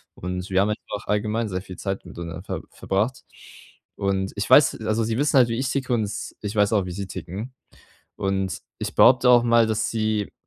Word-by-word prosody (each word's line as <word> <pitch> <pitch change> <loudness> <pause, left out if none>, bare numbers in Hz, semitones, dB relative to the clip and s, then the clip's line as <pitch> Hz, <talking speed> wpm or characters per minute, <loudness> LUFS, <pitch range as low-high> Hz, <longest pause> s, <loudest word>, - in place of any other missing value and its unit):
und 90 +1 -5
wir 95 0 +2
haben 100 - +3
halt 105 0 -2
einfach 105 - -5
allgemein 110 +2 0
sehr 90 -2 -3
viel 90 -1 -10
Zeit 95 0 -4
miteinander 85 0 -7
ver - - -4
verbracht. 105 +7 -2 0.7
Und 95 -1 -1
ich 100 -1 -3
weiß 145 - +6
also, 110 +1 +1
sie 110 +1 -1
wissen 145 0 +2
halt, 125 -2 +5
wie 115 +1 -1
ich 130 0 -1
ticke 130 -2 -1
und 115 -2 +1
s 105 0 -6
ich 105 +1 -4
weiß 105 0 +3
auch, 100 -3 +2
wie 90 - -5
sie 100 +3 -4
ticken. 95 +7 -7 0.6
Und 95 -2 -1 0.2
ich - - -4
behaupte 125 0 +6
auch 120 -1 +7
mal, 115 -1 +4
dass 110 -1 0
sie 110 -2 -1
105 Hz, 210 wpm, -24 LUFS, 95-115 Hz, 0.7 s, auch